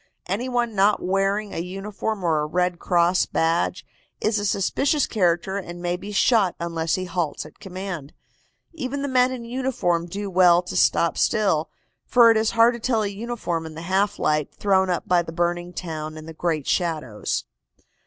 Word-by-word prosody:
Any 215 Hz, +8 st, -2 dB
one 240 Hz, -2 st, 0 dB
not 205 Hz, +1 st, +3 dB
wearing 195 Hz, +2 st, 0 dB
a -, -, -3 dB
uniform 195 Hz, +3 st, -4 dB
or 160 Hz, -3 st, +2 dB
a 150 Hz, -, -1 dB
Red 180 Hz, +2 st, 0 dB
Cross 175 Hz, +1 st, +2 dB
badge 170 Hz, +3 st, 0 dB, 0.3 s
is 215 Hz, 0 st, +1 dB
a 205 Hz, -, -1 dB
suspicious 275 Hz, -, +1 dB
character 185 Hz, -1 st, 0 dB
and 175 Hz, -2 st, -8 dB
may 175 Hz, 0 st, -1 dB
be 200 Hz, +3 st, -8 dB
shot 205 Hz, -2 st, +3 dB
unless 165 Hz, -1 st, -1 dB
he 185 Hz, -, -3 dB
halts 170 Hz, -5 st, -2 dB
at 155 Hz, -, -15 dB
command. 185 Hz, -6 st, -6 dB, 0.6 s
Even 280 Hz, -2 st, -4 dB
the -, -, -1 dB
men 255 Hz, -1 st, +3 dB
in 245 Hz, -2 st, -6 dB
uniform 230 Hz, -9 st, -1 dB
do 200 Hz, +4 st, -5 dB
well 180 Hz, -1 st, +5 dB
to 180 Hz, -, -7 dB
stop 170 Hz, -, +2 dB
still, 190 Hz, -7 st, +2 dB, 0.4 s
for 235 Hz, -2 st, +6 dB
it 225 Hz, -, +3 dB
is 220 Hz, 0 st, +2 dB
hard 230 Hz, +2 st, +6 dB
to 240 Hz, -, -6 dB
tell 225 Hz, -2 st, +1 dB
a -, -, 0 dB
uniform 200 Hz, -5 st, -3 dB
in 155 Hz, -, -10 dB
the 160 Hz, -, -7 dB
half 195 Hz, +3 st, +1 dB
light 150 Hz, -1 st, 0 dB
thrown 190 Hz, -2 st, +2 dB
up 175 Hz, -, -1 dB
by 180 Hz, -1 st, +4 dB
the 165 Hz, -, -7 dB
burning 175 Hz, +1 st, -1 dB
town 155 Hz, -3 st, -5 dB
and 155 Hz, 0 st, -10 dB
the 165 Hz, -, -8 dB
great 155 Hz, -3 st, -1 dB
shadows. 155 Hz, -, -1 dB
185 Hz, 185 wpm, -23 LUFS, 170-215 Hz, 0.6 s, for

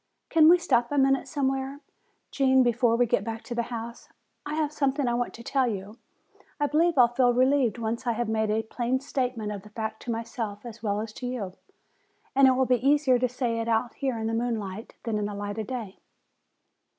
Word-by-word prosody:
"Can 320 Hz, -1 st, +7 dB
we 355 Hz, -, +8 dB
stop 245 Hz, -9 st, +1 dB
a 290 Hz, -, 0 dB
minute 270 Hz, 0 st, +3 dB
somewhere, 270 Hz, -1 st, -2 dB, 0.5 s
Gene, 265 Hz, -1 st, +4 dB
before 240 Hz, -1 st, +2 dB
we 245 Hz, +1 st, +3 dB
get 230 Hz, -4 st, +1 dB
back 225 Hz, +1 st, -5 dB
to 240 Hz, -, -6 dB
the 235 Hz, -, 0 dB
house? 235 Hz, 0 st, -7 dB, 0.4 s
I 300 Hz, -, -3 dB
have 305 Hz, -2 st, 0 dB
something 275 Hz, -2 st, 0 dB
I 240 Hz, -, +1 dB
want 240 Hz, 0 st, -1 dB
to 235 Hz, -, -11 dB
tell 265 Hz, +1 st, +1 dB
you. 205 Hz, 0 st, -5 dB, 0.6 s
I 290 Hz, -, +2 dB
believe 325 Hz, +3 st, +2 dB
I'll 245 Hz, -2 st, +7 dB
feel 245 Hz, 0 st, +2 dB
relieved 255 Hz, -2 st, +3 dB
once 230 Hz, +1 st, -3 dB
I 235 Hz, -, +2 dB
have 240 Hz, +1 st, -2 dB
made 220 Hz, -1 st, 0 dB
a 220 Hz, +1 st, +1 dB
plain 240 Hz, +3 st, -1 dB
statement 250 Hz, -6 st, -2 dB
of 200 Hz, -2 st, -6 dB
a 210 Hz, -, -13 dB
fact 220 Hz, 0 st, -5 dB
to 240 Hz, -, -4 dB
myself 225 Hz, -2 st, -5 dB
as 230 Hz, -1 st, -9 dB
well 205 Hz, -1 st, -1 dB
as 220 Hz, -1 st, -6 dB
to 250 Hz, -, -6 dB
you. 220 Hz, -7 st, -4 dB, 0.8 s
And 275 Hz, 0 st, +7 dB
it 260 Hz, -, +5 dB
will 260 Hz, +1 st, +2 dB
be 250 Hz, -1 st, +1 dB
easier 280 Hz, -3 st, +4 dB
to 250 Hz, 0 st, +1 dB
say 240 Hz, -2 st, -2 dB
it 230 Hz, -, -3 dB
out 230 Hz, +1 st, +1 dB
here 265 Hz, -4 st, -2 dB
in 220 Hz, -, -3 dB
the 225 Hz, -, -1 dB
moonlight 225 Hz, -3 st, -3 dB
than 220 Hz, -3 st, -1 dB
in 205 Hz, -, -1 dB
the 205 Hz, 0 st, -4 dB
light 205 Hz, +1 st, -4 dB
of 215 Hz, -, -4 dB
day." 230 Hz, -7 st, -6 dB
240 Hz, 225 wpm, -27 LUFS, 220-265 Hz, 0.8 s, we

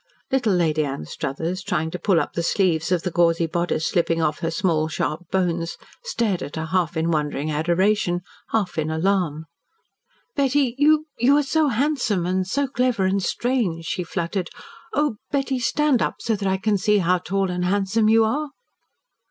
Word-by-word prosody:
Little 250 Hz, -6 st, +2 dB
Lady 155 Hz, -3 st, +2 dB
Anstruthers, 145 Hz, +5 st, -4 dB
trying 175 Hz, -5 st, -2 dB
to 180 Hz, -, -5 dB
pull 190 Hz, -5 st, +3 dB
up -, -, -3 dB
the 170 Hz, -, -1 dB
sleeves 170 Hz, -1 st, +1 dB
of 180 Hz, -2 st, +1 dB
the 180 Hz, -, -2 dB
gauzy 165 Hz, 0 st, +3 dB
bodice 170 Hz, -1 st, -1 dB
slipping 165 Hz, -2 st, +1 dB
off 150 Hz, -2 st, 0 dB
her 165 Hz, -, -1 dB
small, 165 Hz, -2 st, +1 dB
sharp 155 Hz, +1 st, -3 dB
bones, 175 Hz, -3 st, -1 dB, 0.3 s
stared 230 Hz, -, -1 dB
at 145 Hz, -, -6 dB
her 160 Hz, 0 st, -3 dB
half 170 Hz, -1 st, 0 dB
in 165 Hz, +1 st, +1 dB
wondering 150 Hz, -1 st, -1 dB
adoration, 175 Hz, +4 st, +1 dB, 0.3 s
half 200 Hz, -7 st, -1 dB
in 155 Hz, 0 st, -1 dB
alarm. 160 Hz, -2 st, 0 dB, 0.9 s
"Betty 275 Hz, -3 st, +2 dB
you 305 Hz, +1 st, +4 dB
you 265 Hz, +5 st, +5 dB
are 295 Hz, -, +3 dB
so 310 Hz, +2 st, +2 dB
handsome 245 Hz, -, 0 dB
and 185 Hz, +1 st, 0 dB
so 280 Hz, +8 st, 0 dB
clever 250 Hz, -6 st, +1 dB
and 195 Hz, +1 st, +1 dB
strange," 205 Hz, -8 st, -1 dB
she 180 Hz, -, -2 dB
fluttered. 175 Hz, +2 st, -3 dB, 0.4 s
"Oh, 295 Hz, -7 st, 0 dB
Betty, 275 Hz, -2 st, -1 dB
stand 260 Hz, +2 st, +2 dB
up -, -, 0 dB
so 225 Hz, -, -1 dB
that 200 Hz, -1 st, -3 dB
I 190 Hz, -, +1 dB
can 205 Hz, +1 st, 0 dB
see 210 Hz, +2 st, +3 dB
how 180 Hz, -1 st, +2 dB
tall 190 Hz, +1 st, -1 dB
and 180 Hz, 0 st, -2 dB
handsome 200 Hz, +4 st, +2 dB
you 225 Hz, 0 st, +5 dB
are!" 290 Hz, +7 st, -1 dB
185 Hz, 175 wpm, -23 LUFS, 165-225 Hz, 0.9 s, you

